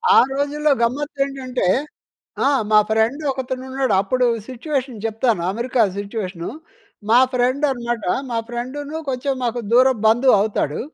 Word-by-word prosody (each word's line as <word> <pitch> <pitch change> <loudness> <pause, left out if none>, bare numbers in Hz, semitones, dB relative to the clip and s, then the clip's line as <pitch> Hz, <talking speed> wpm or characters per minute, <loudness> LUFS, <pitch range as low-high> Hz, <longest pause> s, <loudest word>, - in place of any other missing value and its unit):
ఆ - - +7 0.2
రోజుల్లో 290 +2 0
గమ్మత్తు 280 +5 -1
ఏంటంటే, 260 -6 -3 0.8
ఆ! - - +5 0.2
మా 215 - +6
ఫ్రెండ్ 220 +7 +1
ఒకతను 260 -1 -5
ఉన్నాడు 260 -5 0
అప్పుడు 250 +6 +1 0.2
సిట్యుయేషన్ 260 -3 -4
చెప్తాను, 225 -3 0
అమెరికా 235 +3 0 0.2
సిట్యుయేషన్. 200 -4 -5 0.6
మా 240 +2 +7
ఫ్రెండ్ 255 +3 +1
అనమాట 240 -3 -3 0.3
మా 230 - -1
ఫ్రెండ్‌ను 275 +6 -5
కొంచెం 270 +2 -1
మాకు 240 0 -1
దూరపు 255 -1 +4
బంధువు 240 +4 +4
అవుతాడు. 200 -8 -1
250 Hz, 130 wpm, -20 LUFS, 225-270 Hz, 0.8 s, ఆ